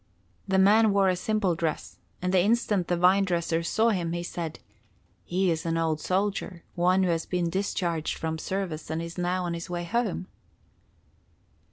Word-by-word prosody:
The 190 -1 +2
man 210 +3 +5
wore 195 -1 +4
a 185 - +2
simple 200 0 0
dress, 165 -1 -3 0.2
and 180 +1 0
the 185 - +5
instant 205 -3 +1
the 175 - +1
vine 185 +3 +5
dresser 170 -3 0
saw 220 +7 +2
him, 175 -6 -1
he 175 0 -3
said: 170 -2 -5 0.7
"He 185 0 +1
is 160 -1 -2
an 165 0 -1
old 160 -2 0
soldier, 190 -1 -1
one 180 +2 +3
who 185 - +1
has 165 -1 -1
been 175 -2 -1
discharged 175 -4 -1
from 160 -1 -3
service 185 -4 -4
and 160 - -2
is 170 +1 -6
now 180 +1 0
on 170 - -2
his 170 0 -6
way 175 0 -3
home." 215 0 -1
180 Hz, 180 wpm, -27 LUFS, 170-195 Hz, 0.7 s, man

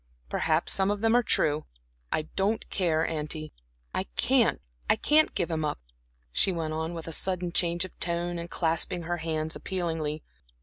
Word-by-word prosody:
Perhaps 160 +1 +2
some 190 0 +3
of 205 0 -1
them 225 +1 +4
are 245 - +6
true; 150 -9 +2 0.5
I 155 - +1
don't 200 +3 0
care. 165 -4 +1
Auntie, 155 0 -3 0.4
I - - -1
can't - - +3 0.3
I - - +6
can't 310 +1 +4
give 175 -3 -1
him 160 -1 -1
up," 150 - -2 0.5
she 190 - +3
went 160 -3 -2
on 160 +2 -3
with 165 -1 -6
a - - -4
sudden 180 0 +1
change 170 0 +1
of 185 - -13
tone 175 0 -1
and 170 +1 -6
clasping 170 +1 0
her 175 +1 -2
hands 160 -1 -2
appealingly. 165 -5 -3
170 Hz, 175 wpm, -28 LUFS, 160-185 Hz, 0.5 s, are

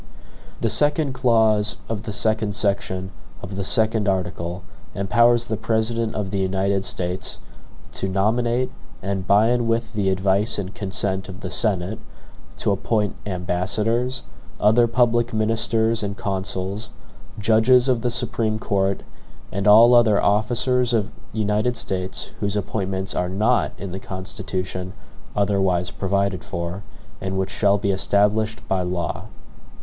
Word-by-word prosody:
The - - +1
second 150 -1 +2
clause 110 -5 +3
of 110 -3 -3
the - - -2
second 110 0 0
section 100 -2 -1 0.3
of 95 +2 -6
the 100 - -2
second 110 +1 +2
article 90 -1 -2 0.3
empowers 120 +4 +3
the 110 - -2
President 115 0 -1
of 100 -3 -3
the 100 - -1
United 95 +1 0
States 90 0 -2 0.5
"to 95 - -2
nominate, 120 +6 +1 0.3
and 95 -1 -3
by 105 +3 +5
and 120 -1 +1
with 115 0 -1
the 100 -3 0
advice 95 +3 +1
and 100 -1 -4
consent 95 -3 -2
of 95 +1 -9
the 95 - -5
Senate, 100 +1 0 0.6
to - - +1
appoint 105 +1 0
ambassadors, 105 +7 0 0.4
other 110 +3 +4
public 120 0 +2
ministers 110 +1 +2
and 100 -1 -4
consuls, 95 +1 -3 0.5
judges 115 +4 +4
of 125 -3 +2
the 125 - 0
Supreme 115 -3 0
Court, 100 -2 -1 0.5
and 100 +1 -1
all 115 +4 +8
other 115 -4 +5
OFFICERS 120 +4 +2
of 110 -1 0 0.2
United 110 +3 0
States 95 -3 -3
whose 100 0 -1
appointments 95 -1 -2
are 90 0 -1
NOT 110 +6 +1
in 100 -2 -6
the 95 - -5
Constitution 95 -1 -5 0.4
OTHERWISE 95 -3 +1
PROVIDED 100 -3 -1
FOR, 85 +2 -5 0.4
and 95 0 -3
WHICH 95 0 -1
SHALL 100 -1 +2
BE 100 -1 0
ESTABLISHED 105 +3 +1
BY 95 -1 0
LAW." 90 -1 -3
105 Hz, 135 wpm, -22 LUFS, 95-115 Hz, 0.6 s, all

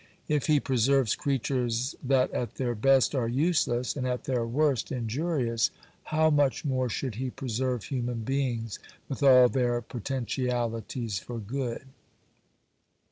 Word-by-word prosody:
If 150 -1 0
He 150 -2 +4
preserves 130 -2 +2
creatures 125 -2 -1
that 130 -1 +2
at 120 - -3
their 125 -2 -1
best 135 +5 +3
are 125 -5 0
useless, 125 -2 +1
and 130 -3 -2
at 125 0 -2
their 125 -3 -1
worst 135 0 +1
injurious, 125 -1 0 0.4
how 160 0 +2
much 145 0 +2
more 130 -3 0
should 130 +2 -3
He 130 +4 -3
preserve 125 -2 -2
human 125 -3 -3
beings 120 -3 -2 0.3
with 135 - -5
all 130 -3 +8
their 120 -1 +1
potentialities 120 -2 -3
for 120 +2 -7
good. 120 +3 -4
125 Hz, 135 wpm, -28 LUFS, 120-135 Hz, 0.4 s, all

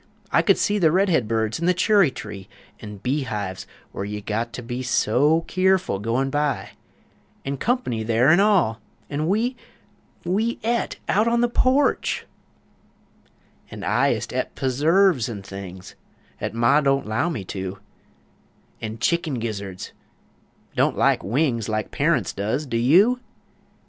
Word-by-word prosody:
I - - +4
could - - +3
see 205 0 +1
The 160 -4 +4
red 190 +3 +2
heads 115 -6 0
in 170 - -1
the 180 - +3
churry 195 -2 +4
tree; 105 -6 -9 0.3
An' 105 -1 -9
bee 130 +9 -1
hives, 105 -7 -5 0.2
where - - -5
you 105 +1 -4
got 110 +3 -3
to 125 - -6
be 120 +2 -4
So 130 +6 +2
keerful, 185 - +1
goin' 120 +6 -1
by; 145 -1 -1 0.7
An' 140 0 -3
"Comp'ny" 235 - -1
there 115 +4 +3
an' 170 +4 +6
all! 185 - +3 0.3
an' 150 +2 -1
we 225 +7 +1 0.7
We 215 +7 0
et 235 +1 0
out 215 +4 +2
on 235 0 +2
the 240 - +3
porch! 255 +4 +1 1.4
An' - - -8
I - - +2
ist - - -2
et - - -3
p'surves 145 - +2
an' 100 -4 -6
things 95 -2 -9 0.5
'At - - -4
Ma 120 +6 +4
don't 135 -1 +1
'low 110 +11 0
me 120 - -4
to 95 +1 -5 1.0
An' 110 0 -5
chickun 160 -1 0
gizzurds 100 -5 -5 0.8
(don't - - +1
like - - +2
wings 115 - 0
Like 110 0 -2
Parunts 140 - +1
does! 110 +9 -2
do 120 -4 -2
you?) 185 - +4
135 Hz, 150 wpm, -23 LUFS, 110-180 Hz, 1.4 s, an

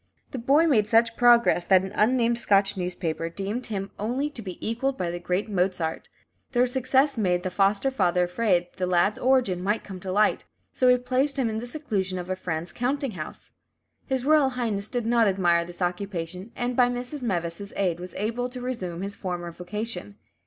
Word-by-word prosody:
The 260 - -4
boy 280 +7 +4
made 225 -10 +3
such 230 +1 +3
progress 240 -7 +5
that 190 -1 +5
an 190 - -5
unnamed 235 +1 +2
Scotch 200 -2 +3
newspaper 175 -3 -3
deemed 200 +8 -4
him 200 -3 -4
"only 255 +8 -1
to 250 - -7
be 185 -4 -7
equalled 265 +4 -1
by 175 -1 -2
the 175 - -5
great 180 +4 -1
Mozart." 180 -5 -1 0.4
This 245 0 +2
success 265 0 +2
made 180 -3 +1
the 185 - -2
foster 200 +7 +2
father 180 -7 +2
afraid 180 -1 +1
the 185 - -1
lad's 180 +4 +2
origin 250 -9 +2
might 205 +4 0
come 190 -2 -8
to 185 +1 -5
light, 210 +2 +2 0.3
so 255 - +2
he 250 0 +6
placed 260 +3 0
him 245 -4 +1
in 220 - -2
the 240 - -6
seclusion 210 -10 -2
of 180 +1 -5
a - - 0
friend's 170 -2 -4
counting 270 +2 -1
house. 155 -6 -8 0.6
His 265 -2 -1
Royal 300 -2 +5
Highness 225 -6 -2
did 245 -1 -3
not 230 -1 +3
admire 175 -3 +2
this 175 +1 -5
occupation, 180 +1 -4
and 245 0 -2
by 245 0 +4
Mrs. 245 +4 -4
Meves' 180 -3 -3
aid 180 -4 0
was 180 -1 -7
enabled 240 +4 -2
to 250 - -6
resume 190 -9 -4
his 200 0 -3
former 175 -2 -4
vocation. 180 - -5
205 Hz, 195 wpm, -26 LUFS, 180-245 Hz, 0.6 s, he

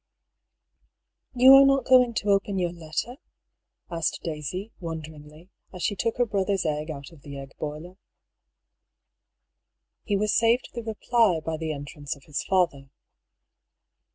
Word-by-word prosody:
"You 255 +2 +8
are 270 0 +10
not 275 0 +3
going 250 -2 +5
to 205 - -1
open 200 0 +1
your 175 -2 0
letter?" 170 +9 -5 0.7
asked 165 -1 -2
Daisy, 170 +6 -5
wonderingly, 160 0 -9 0.2
as 180 -2 -7
she 205 - 0
took 225 +6 -2
her 245 - +3
brother's 200 -3 -1
egg 150 0 -2
out 140 -1 -7
of 160 -4 -17
the 140 0 -9
egg 135 0 -9
boiler. 155 +5 -6 2.1
He 205 - 0
was 210 +1 +1
saved 230 +2 +2
the 235 - -4
reply 220 -4 +1
by 160 +1 -4
the 160 0 -3
entrance 145 +1 -6
of 140 - -19
his 145 0 -4
father. 170 -8 0
175 Hz, 140 wpm, -26 LUFS, 155-220 Hz, 2.1 s, are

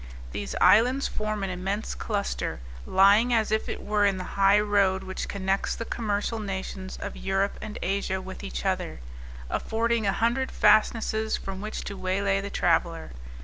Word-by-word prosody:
These - - -4
islands 245 +8 +5
form 215 -1 -3
an 195 - -2
immense 195 +4 -3
cluster, 205 - -3 0.3
lying 200 +5 +5
as 220 -2 +1
if 220 0 0
it - - -5
were 210 0 +1
in 200 -2 +3
the 185 - -4
high 200 +1 +5
road 200 -2 +2
which 185 - -5
connects 195 0 -1
the 230 - -5
commercial 220 0 -2
nations 190 -2 -5
of - - -5
Europe 195 +1 -1
and 210 - -6
Asia 190 0 -1
with 190 0 -9
each - - -5
other, - - -1 0.5
affording 230 - 0
a - - +3
hundred 235 +6 +1
fastnesses 220 +1 +3
from 195 0 -6
which 215 +1 -5
to 200 - -6
waylay 195 +1 0
the 200 - -5
traveller. 165 - 0
200 Hz, 165 wpm, -27 LUFS, 190-215 Hz, 0.5 s, islands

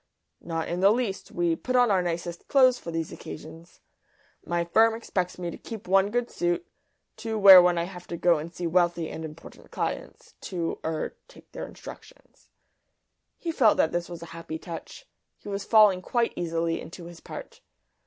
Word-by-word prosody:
"Not 165 -1 -3
in 175 - -3
the 195 +2 +6
least. 220 -3 -1
We 175 -1 0
put 255 +9 -3
on 245 -3 +5
our 190 -2 +3
nicest 170 0 -4
clothes 255 -2 +5
for - - -8
these 165 -1 -3
occasions. 165 +2 -10 0.6
My 170 0 -1
firm 225 +6 +4
expects 185 -5 -3
me 175 -1 -4
to - - -10
keep 220 -5 -9
one 195 +1 +4
good 245 +2 -1
suit 175 0 -1 0.5
to 220 0 -3
wear 195 -3 +10
when 175 -1 +3
I 170 - +1
have 180 0 -9
to 170 - -5
go 170 -2 +3
and 160 +3 -7
see 175 0 -6
wealthy 175 -1 +1
and 160 - -6
important 155 0 -11
clients - - -5 0.2
to 170 -3 -3
er 160 -1 -3
take - - -18
their - - -6
instructions." - - -14 0.9
(He 335 - -3
felt 235 -9 +4
that 160 - +3
this 175 0 -2
was 170 -1 -8
a 170 - -10
happy 165 -1 -6
touch; 170 - -9 0.3
he - - -10
was 200 0 -4
falling 210 -5 +5
quite 235 +4 0
easily 165 -1 -1
into 170 +1 -10
his 170 -1 -11
part). 475 0 -10
175 Hz, 185 wpm, -26 LUFS, 170-210 Hz, 0.9 s, wear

